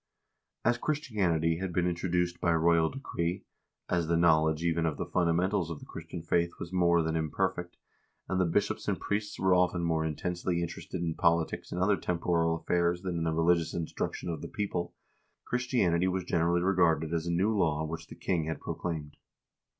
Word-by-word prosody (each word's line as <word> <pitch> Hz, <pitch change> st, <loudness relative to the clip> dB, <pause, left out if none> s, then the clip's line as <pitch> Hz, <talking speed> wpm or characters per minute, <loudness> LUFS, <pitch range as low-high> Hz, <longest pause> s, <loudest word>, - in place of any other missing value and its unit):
As 120 Hz, +1 st, +3 dB
Christianity 95 Hz, -, 0 dB
had 95 Hz, 0 st, -3 dB
been 90 Hz, +1 st, +1 dB
introduced 90 Hz, 0 st, -1 dB
by 85 Hz, -1 st, +3 dB
royal 80 Hz, 0 st, +3 dB
decree, 90 Hz, -10 st, -3 dB, 0.4 s
as 85 Hz, -2 st, 0 dB
the 85 Hz, 0 st, +2 dB
knowledge 80 Hz, -1 st, +3 dB
even 85 Hz, -1 st, +1 dB
of 80 Hz, -, -2 dB
the -, -, -2 dB
fundamentals 90 Hz, +1 st, +1 dB
of 85 Hz, -, -4 dB
the -, -, -11 dB
Christian 85 Hz, -2 st, -8 dB
faith 85 Hz, 0 st, +1 dB
was 85 Hz, -, -7 dB
more 85 Hz, -2 st, +4 dB
than 80 Hz, 0 st, -1 dB
im 80 Hz, -1 st, 0 dB
perfect, 90 Hz, +3 st, -2 dB, 0.5 s
and 95 Hz, -1 st, +1 dB
the -, -, +3 dB
bishops 100 Hz, +5 st, 0 dB
and 100 Hz, -3 st, 0 dB
priests 105 Hz, 0 st, -2 dB
were 95 Hz, -1 st, +3 dB
often 90 Hz, -1 st, +2 dB
more 80 Hz, -1 st, +1 dB
intensely 85 Hz, +3 st, -2 dB
in 85 Hz, -, 0 dB
terested 85 Hz, +1 st, -6 dB
in 80 Hz, -1 st, -1 dB
politics 85 Hz, -1 st, +1 dB
and 90 Hz, -, -3 dB
other 100 Hz, 0 st, +3 dB
temporal 85 Hz, -1 st, +1 dB
affairs 85 Hz, +1 st, 0 dB
than 90 Hz, -3 st, -2 dB
in 80 Hz, -, -1 dB
the 80 Hz, -, +1 dB
religious 80 Hz, 0 st, +2 dB
instruction 85 Hz, +1 st, -3 dB
of 80 Hz, -3 st, -4 dB
the -, -, -5 dB
people, 90 Hz, -4 st, -3 dB, 0.5 s
Christianity 110 Hz, -9 st, +1 dB
was 95 Hz, 0 st, -1 dB
generally 85 Hz, 0 st, +1 dB
regarded 85 Hz, -4 st, +2 dB
as 85 Hz, 0 st, -1 dB
a -, -, 0 dB
new 100 Hz, +6 st, +2 dB
law 80 Hz, -5 st, +1 dB
which 80 Hz, +1 st, -6 dB
the -, -, -10 dB
king 85 Hz, -4 st, -1 dB
had 80 Hz, 0 st, -3 dB
proclaimed. 80 Hz, -4 st, -5 dB
85 Hz, 190 wpm, -30 LUFS, 80-90 Hz, 0.5 s, more